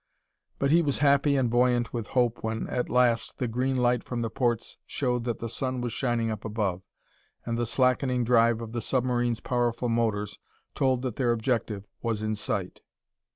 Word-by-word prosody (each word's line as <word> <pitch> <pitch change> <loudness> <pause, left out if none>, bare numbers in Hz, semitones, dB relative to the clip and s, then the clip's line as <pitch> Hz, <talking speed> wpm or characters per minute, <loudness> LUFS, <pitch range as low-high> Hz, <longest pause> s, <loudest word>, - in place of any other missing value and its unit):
But 140 0 +1
he 170 +2 +6
was 145 -4 0
happy 140 0 +4
and 130 -3 +2
buoyant 120 -1 +2
with 115 -3 -3
hope 120 -2 +2
when, 110 0 -2
at 125 - -2
last, 120 -2 +2
the 125 - -1
green 130 +3 0
light 125 -1 +2
from 120 -2 -3
the 115 - -3
ports 120 -3 -1
showed 125 -3 -1
that 120 -2 -1
the 115 - -5
sun 130 +2 -3
was 120 -2 -3
shining 120 -3 0
up 110 -2 -5
above, 105 -5 -2 0.6
and 115 - -2
the 120 0 -1
slackening 125 0 +2
drive 115 -1 +3
of 115 -1 -6
the 120 0 -3
submarine's 120 -1 0
powerful 120 -1 0
motors 110 -3 -1 0.3
told 130 -2 +1
that 125 -4 -3
their 125 -3 +2
objective 110 -3 -1 0.2
was 110 -2 -2
in 110 0 -1
sight. 105 - -3
120 Hz, 185 wpm, -27 LUFS, 115-125 Hz, 0.6 s, he